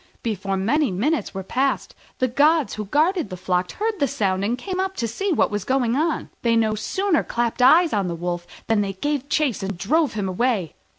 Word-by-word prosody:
Before 195 -3 -2
many 260 +9 +1
minutes 215 - -1
were 190 - -4
passed 265 +7 -1 0.2
the 255 - +1
gods 295 +4 +3
who 215 - -4
guarded 310 - +1
the 185 - -6
flock 180 0 -1
heard 435 -1 -2
the 280 - +2
sound 190 -5 -1
and 230 +4 0
came 370 +6 -4
up 380 0 -1
to 230 - -1
see 390 - -2
what 315 - +2
was 205 -2 -2
going 250 0 +1
on. 315 +2 -1
They 230 -1 +2
no 220 -1 +2
sooner 370 - 0
clapped 235 +1 -2
eyes 320 +7 +6
on 200 -3 +1
the 170 - -3
Wolf 175 0 -4 0.2
than 225 -2 +2
they 195 -1 -2
gave 285 +7 -2
chase 295 -8 +1
and 195 -1 -4
drove 290 - +1
him 205 -3 -2
away. 190 - 0
235 Hz, 215 wpm, -23 LUFS, 195-300 Hz, 0.2 s, eyes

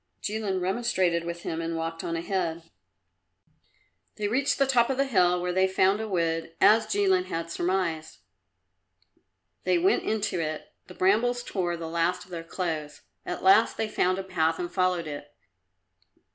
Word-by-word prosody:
Jilin 210 -3 -2
remonstrated 185 -4 0
with 170 0 -5
him 165 0 -3
and 165 0 -3
walked 165 0 -4
on 165 - -2
ahead. 170 -1 -2 1.5
They 210 - -2
reached 265 +6 +1
the 275 - +3
top 250 -2 +3
of 265 - -1
the 275 - +2
hill, 180 -8 +3
where 180 0 -2
they 190 +1 +3
found 190 +2 +2
a 220 - -4
wood, 165 -3 -1
as 220 +1 +5
Jilin 195 -3 +2
had 165 -2 -4
surmised. 170 -3 -2 1.5
They - - +2
went 370 +4 +3
into 215 -4 -1
it. 155 -1 -4
The 180 - -12
brambles 240 +6 +2
tore 175 -6 -2
the 165 -1 -6
last 170 +2 -1
of 185 - -20
their 170 -2 -5
clothes. 165 -4 -4 0.2
At 180 - -4
last 195 +4 +5
they 220 - -1
found 185 -3 +1
a 195 - -3
path 160 -3 0
and 175 -1 -4
followed 185 -2 +1
it. 145 -1 -8
180 Hz, 165 wpm, -27 LUFS, 165-205 Hz, 1.5 s, as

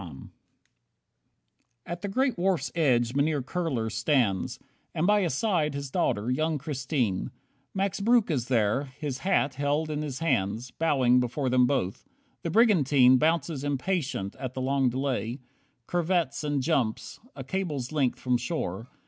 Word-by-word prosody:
23 75 -8 -10 1.6
At 175 0 -6
the 205 - -3
great 260 +6 +1
wharf's 185 -1 0
edge 125 -7 +2
Mynheer 145 0 +1
Kurler 130 -7 -2
stands, 115 -3 0 0.4
And 160 - +1
by 210 +1 +4
his 170 -8 0
side, 160 -7 0
his 140 -1 -5
daughter, 110 0 0
young 155 +4 0
Christine. 135 - -2 0.5
Max 195 +1 -1
Breuck 225 -2 +3
is 125 -5 -1
there, 120 +2 +1
his 140 -4 -4
hat 145 -6 +1
held 145 +3 -1
in 150 0 -2
his 145 -4 -4
hands, 120 -6 -1
Bowing 130 -6 +3
before 125 +2 -1
them 125 -1 +4
both. 110 -9 -1 0.4
The 165 - -3
brigantine 145 - +5
Bounces 160 -2 0
impatient 145 - -2
at 130 -1 -6
the 130 - -3
long 135 0 +2
delay, 125 -2 -2 0.5
Curvets 170 -4 0
and 145 -3 -1
jumps, 130 -9 -1 0.2
a - - -6
cable's 155 -10 -3
length 140 -5 0
from 125 -1 +1
shore. 120 - -4
140 Hz, 150 wpm, -27 LUFS, 125-165 Hz, 1.6 s, brigantine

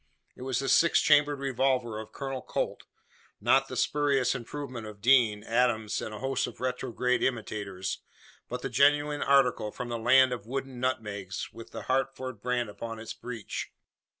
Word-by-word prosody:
It - - -13
was 130 -1 -1
the 135 - -1
six 170 +4 +5
chambered 145 0 +4
revolver 130 -4 0
of 110 0 -9
Colonel 135 -2 -4
Colt - - -3 0.5
not 135 +5 +3
the 130 - -6
spurious 140 -1 +2
improvement 125 -2 -6
of 105 -1 -10
Deane, 110 -3 +4
Adams, 115 -2 +1
and - - -5
a 105 - -6
host 135 +2 -1
of 125 - -10
retrograde 125 0 -1
imitators 105 -6 -2 0.5
but - - -5
the - - -2
genuine 145 +1 +3
article 135 -6 +3
from 125 +3 -6
the 120 -1 -3
"land 130 +2 +5
of 115 -3 -7
wooden 135 0 -4
nutmegs," 105 -7 -3
with 115 - -10
the - - -7
Hartford 130 0 -2
brand 125 -1 0
upon 115 +2 -6
its 110 0 -6
breech. 115 -4 -6
125 Hz, 165 wpm, -29 LUFS, 110-135 Hz, 0.5 s, six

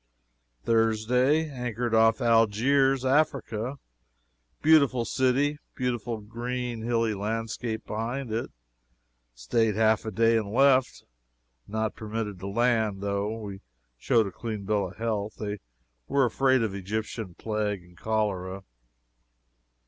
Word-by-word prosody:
"Thursday 120 +7 +2
Anchored 125 -4 -3
off 115 0 +4
Algiers, 120 +4 +3
Africa. 130 -3 0 0.9
Beautiful 140 -6 +5
city, 135 +5 +1 0.2
beautiful 120 -3 -2
green 120 +2 -4
hilly 115 -1 +1
landscape 110 +2 -3
behind 115 +3 -3
it. 115 +2 -2 0.9
Staid 105 - +1
half 110 0 +3
a 110 - -4
day 115 +2 +3
and 105 -2 -2
left. 130 +1 +3 0.6
Not 110 +1 -2
permitted 110 -3 -5
to 95 - -6
land, 110 -2 +1
though 100 +2 -2
we 100 -3 -7 0.4
showed 115 - +3
a 100 - -5
clean 110 0 -5
bill 100 -2 +1
of 90 - -13
health. 110 -2 -2
They 105 -1 -4 0.5
were 140 -2 +3
afraid 130 +1 +2
of 110 -3 -2
Egyptian 100 0 -4
plague 105 -3 -2
and 90 0 -19
cholera. 95 -2 -2
115 Hz, 120 wpm, -27 LUFS, 105-125 Hz, 0.9 s, Beautiful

